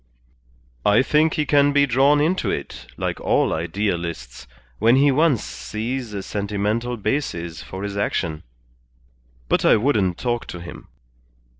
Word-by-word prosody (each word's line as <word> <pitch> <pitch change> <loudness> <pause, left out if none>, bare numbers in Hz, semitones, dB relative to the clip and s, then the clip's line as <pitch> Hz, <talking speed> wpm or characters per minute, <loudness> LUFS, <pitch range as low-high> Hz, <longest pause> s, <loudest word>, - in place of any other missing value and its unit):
"I 105 +5 +4
think 155 +3 +2
he 150 - 0
can 145 -1 +3
be 145 0 +4
drawn 140 +3 +3
into 165 +6 +1
it, 60 - -5
like - - -3
all - - +2
idealists, 85 - -3 0.3
when 115 +3 +5
he 140 +1 +4
once 145 -4 +2
sees 115 +2 -5
a 100 - -4
sentimental 105 +5 -2
basis 85 - -3
for 95 +6 -8
his 100 -1 -4
action. 85 -6 -2 1.1
But - - +1
I - - +6
wouldn't 105 -7 +1
talk 120 -1 -2
to 90 - -7
him. 85 +1 -10
110 Hz, 140 wpm, -22 LUFS, 95-140 Hz, 1.1 s, I